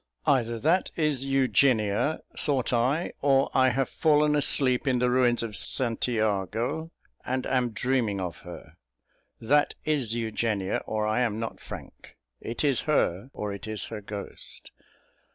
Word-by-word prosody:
"Either 120 -4 +2
that 165 +10 +2
is 150 -5 +1
Eugenia," 130 -2 +2
thought 135 -4 0
I, 130 +8 +1
"or 135 -1 +3
I 130 0 +4
have 130 +1 0
fallen 150 -1 +2
asleep 135 -2 +2
in 130 -2 +3
the 125 0 +1
ruins 125 -2 +3
of 110 -2 -4
St 120 0 +1
Jago, 110 - -1 0.3
and 130 0 -2
am 125 -2 +1
dreaming 115 -3 0
of 90 -3 -4
her. 90 0 -12 0.6
That 145 +6 +2
is 135 -8 0
Eugenia, 110 -4 -1
or 110 0 -1
I 110 +3 +1
am 115 -3 0
not 115 - -5
Frank. - - -11 0.2
It 115 - -4
is 140 -4 +3
her, 100 - +1
or 105 -5 -4
it 100 - -8
is 110 -2 0
her 105 - -5
ghost." 100 0 -6
125 Hz, 150 wpm, -27 LUFS, 110-135 Hz, 0.6 s, I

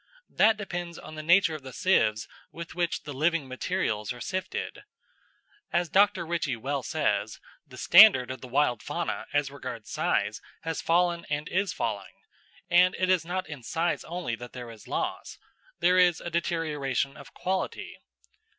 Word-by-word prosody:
That 220 0 +4
depends 175 -4 -5
on - - -10
the 155 - -6
nature 170 +1 +4
of 155 - -6
the 130 -1 -9
sieves 110 - +2 0.2
with 170 0 -8
which 175 0 -1
the 145 - -7
living 155 +1 +1
materials 130 - -2
are 125 - -7
sifted. 185 +5 -4 0.9
As 175 -1 +1
Dr. 195 -2 +3
Ritchie 165 -6 -1
well 135 +4 -3
says, 110 -8 -1 0.3
the 130 -2 -13
standard 175 - +7
of 130 -2 -7
the 130 - -8
wild 125 -3 +1
fauna - - -3
as 145 -2 0
regards 125 -5 -8
size - - 0 0.2
has 165 -1 -3
fallen 170 0 +1
and 150 0 -2
is 190 +1 0
falling, 100 -4 -4 0.5
and 180 +2 +5
it 185 0 +2
is 180 -3 +3
not 180 +2 -3
in 150 -4 -8
size 165 +10 -1
only 170 -6 -4
that 120 +1 -10
there 120 -2 -7
is 110 -2 -14
loss, - - -3 0.4
there 180 +2 +5
is 175 -2 +4
a 175 - -6
deterioration 150 -5 -1
of 140 - -13
quality. 185 +1 -3
160 Hz, 165 wpm, -28 LUFS, 130-175 Hz, 0.9 s, standard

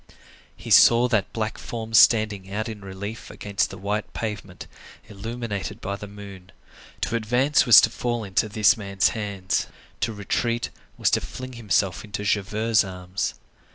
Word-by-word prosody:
He - - -8
saw 120 +1 +7
that 110 -6 0
black 110 -1 -3
form 115 -1 -6
standing 105 -3 +4
out 110 +3 -2
in 110 -2 -7
relief 100 +3 -7
against 100 -2 -2
the - - -9
white 105 +2 -3
pavement, 105 -4 -5 0.4
illuminated 110 0 -5
by 100 +1 -4
the 105 +1 -8
moon; 100 -2 -11 0.5
to - - -1
advance 125 +5 +2
was 120 - +10
to 110 - +2
fall 120 -2 -2
into 100 +2 0
this 105 +2 +4
man's 100 -5 +1
hands; 100 0 -2 0.3
to 115 - 0
retreat 115 +3 -2 0.3
was - - +2
to - - +2
fling 130 0 -8
himself 100 -5 0
into 105 -2 -5
Javert's 105 +2 +1
arms. 90 0 -4
105 Hz, 155 wpm, -24 LUFS, 100-115 Hz, 0.5 s, was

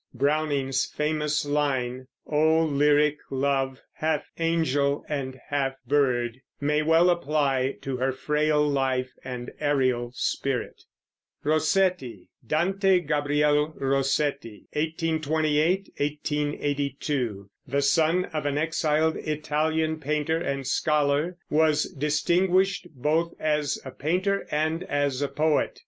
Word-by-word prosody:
Browning's 140 -2 +1
famous 150 -1 -1
line, 130 -3 -1 0.2
"O 160 +2 +3
lyric 150 0 +3
love, 135 -1 -1
half 155 -1 -1
angel 145 -4 +1
and 130 -3 -4
half 135 -2 0
bird," 125 -3 +1 0.2
may 150 +1 +1
well 165 +3 +4
apply 140 -5 0
to 135 -2 -3
her 130 +1 0
frail 150 +2 +1
life 130 -2 0
and 125 -1 -6
aerial 130 -5 +1
spirit. 135 0 -2 0.6
ROSSETTI. 155 - +1 0.2
Dante 190 +3 +2
Gabriel 150 0 +1
Rossetti 135 -3 -1
(1828 160 +2 0
1882), 145 -6 -2 0.2
the 140 +2 0
son 165 +5 +3
of 150 -2 -2
an 145 0 -1
exiled 155 0 +1
Italian 155 +1 -1
painter 150 +2 0
and 140 -5 -3
scholar, 150 +5 +1
was 155 -1 +3
distinguished 175 +6 +1
both 160 +6 0
as 150 -2 0
a 130 - -6
painter 185 +8 -1
and 160 +2 0
as 145 -5 -1
a 145 - +1
poet. 155 +1 0
150 Hz, 105 wpm, -26 LUFS, 135-155 Hz, 0.6 s, well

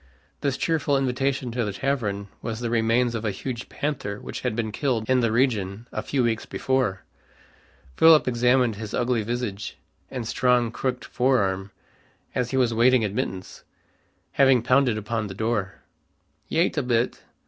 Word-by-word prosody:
This 140 -2 -1
cheerful 150 -3 +1
invitation 135 -1 -1
to 120 0 -1
the 105 -2 -3
tavern 105 -6 -2
was 115 -1 -4
the 120 -1 -3
remains 115 +1 +2
of 115 -1 -3
a 110 - 0
huge 120 +5 -5
panther 130 -9 -3
which - - -7
had - - -1
been 110 -2 -2
killed 115 -3 -1
in 130 -1 +3
the 115 -2 +1
region 115 -3 0
a - - -3
few 135 -3 0
weeks 115 -2 -1
before. 125 -8 -1 0.9
Philip 160 -3 +7
examined 125 -2 +2
his 110 -1 -5
ugly 120 -2 +1
visage 110 -3 -4 0.3
and 125 -4 -5
strong 125 -1 +2
crooked 125 +1 -3
fore 130 +1 +2
arm, 95 -2 -1 0.6
as 125 -2 -1
he 130 - -1
was 125 -3 +2
waiting 120 0 +4
admittance, 95 -2 -4 0.7
having 135 -4 +4
pounded 125 -2 +3
upon 110 0 -2
the 95 - -8
door. 110 -3 -1 0.7
"Yait 165 -1 +1
a - - +1
bit. 120 -2 0
120 Hz, 160 wpm, -25 LUFS, 110-130 Hz, 0.9 s, Philip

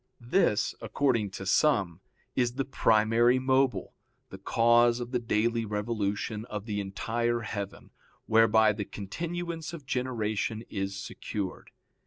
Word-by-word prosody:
This, 120 - +1
according 120 -7 +1
to 95 - -7
some, 95 - +2 0.3
is 120 -1 +1
the 135 0 -1
primary 115 0 +3
mobile, 130 0 +1 0.4
the 95 - -9
cause 120 +3 +4
of 120 0 -5
the 125 - +1
daily 115 0 0
revolution 105 0 -2
of 105 -3 -6
the 105 -2 -2
entire 115 +4 -1
heaven, 100 -3 -6 0.3
whereby 110 -1 +5
the 105 0 -3
continuance 165 - -5
of 155 -5 -8
generation 115 -4 -2
is 95 -1 -3
secured. 95 -1 -5
115 Hz, 125 wpm, -29 LUFS, 105-125 Hz, 0.4 s, whereby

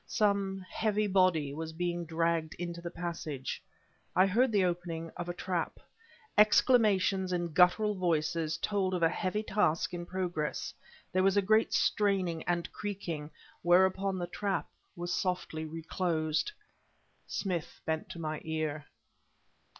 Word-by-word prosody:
Some 200 -3 +1
heavy 215 0 0
body 185 -7 +3
was 160 +1 -5
being 175 0 -2
dragged 165 0 0
into 170 0 -5
the 170 - -4
passage. 165 -6 -4 0.5
I 185 - +6
heard 230 +6 +3
the 200 -3 +3
opening 170 -2 -3
of 175 0 -5
a - - -1
trap. 180 -2 -2 0.6
Exclamations 210 -4 +4
in 175 -2 -1
guttural 185 +5 +5
voices 165 -3 0
told 190 +1 0
of 175 - -1
a 165 - +6
heavy 190 +5 -1
task 190 -5 +1
in 175 0 -5
progress; 175 -5 -2 0.4
there 185 - +3
was 195 +1 +3
a - - +6
great 215 +3 +3
straining 190 -6 +1
and 175 -1 -1
creaking 170 -7 -4 0.3
whereupon 190 +2 +3
the 175 - -2
trap 195 +3 -2 0.3
was 175 0 -3
softly 180 -4 -2
reclosed. 160 - -1 0.8
Smith 180 -6 -3
bent 160 0 -2
to - - -7
my 155 -2 -3
ear. 155 -2 -3
175 Hz, 135 wpm, -31 LUFS, 165-195 Hz, 0.8 s, I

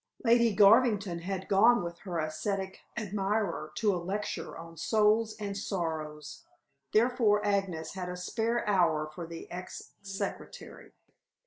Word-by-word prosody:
Lady 235 0 +5
Garvington 205 -3 +5
had 190 +2 -4
gone 225 +3 +5
with 170 0 -6
her 180 -4 -5
ascetic 190 +5 -3 0.2
admirer 200 -6 -1
to 210 -3 +2
a 175 - -2
lecture 200 +4 -4
on 165 0 -10
"Souls 215 +5 +2
and 200 -1 -4
Sorrows!" 160 -6 -4 0.5
therefore 220 -2 +3
Agnes 195 -6 -1
had 185 -2 -5
a 180 - -5
spare 225 +6 -1
hour 170 -6 +3
for 160 +2 -8
the 165 0 -8
ex 180 +1 -8
secretary. 195 -1 -7
195 Hz, 130 wpm, -30 LUFS, 170-210 Hz, 0.5 s, Lady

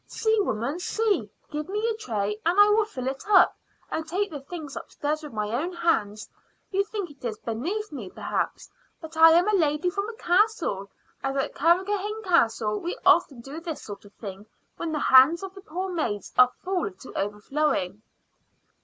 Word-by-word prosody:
See, 440 0 +1
woman 270 - -1
see! 400 - 0 0.2
Give 300 +3 -4
me 425 +3 -1
a 460 - +1
tray 210 - -3
and 350 +4 +2
I 410 0 +8
will 425 +1 +4
fill 260 - -6
it 265 +1 -3
up 385 -4 +6 0.4
and 320 - -1
take 390 +4 -1
the 295 - -5
things 295 0 -8
upstairs 300 +1 -3
with 300 -2 -8
my 210 -1 -3
own 295 +10 -1
hands. 215 -12 0 0.4
You 395 0 +2
think 400 -5 -5
it 280 - -19
is 225 -3 -3
beneath 335 - -3
me, 240 -10 -7
perhaps; - - -3 0.3
but 320 -1 -10
I 325 0 +8
am 350 +4 +4
a 425 - +2
lady 320 -1 +2
from 400 +3 -2
a 460 - -8
castle, 350 - +1 0.3
and 270 0 -2
at 270 - -1
Carrigrohane 395 +7 +1
Castle 225 - +2
we 350 - -4
often 260 -5 +4
do 275 +6 -8
this 330 -3 -6
sort 205 -2 -8
of 205 0 -17
thing 200 -1 -9 0.3
when 335 - -3
the 310 - -1
hands 275 +6 +6
of 385 -1 -6
the 390 - -11
poor 370 +3 -4
maids 210 - -3
are 250 0 +6
full 365 - -1
to 185 - -13
overflowing." 210 0 -1
315 Hz, 190 wpm, -26 LUFS, 235-380 Hz, 0.4 s, I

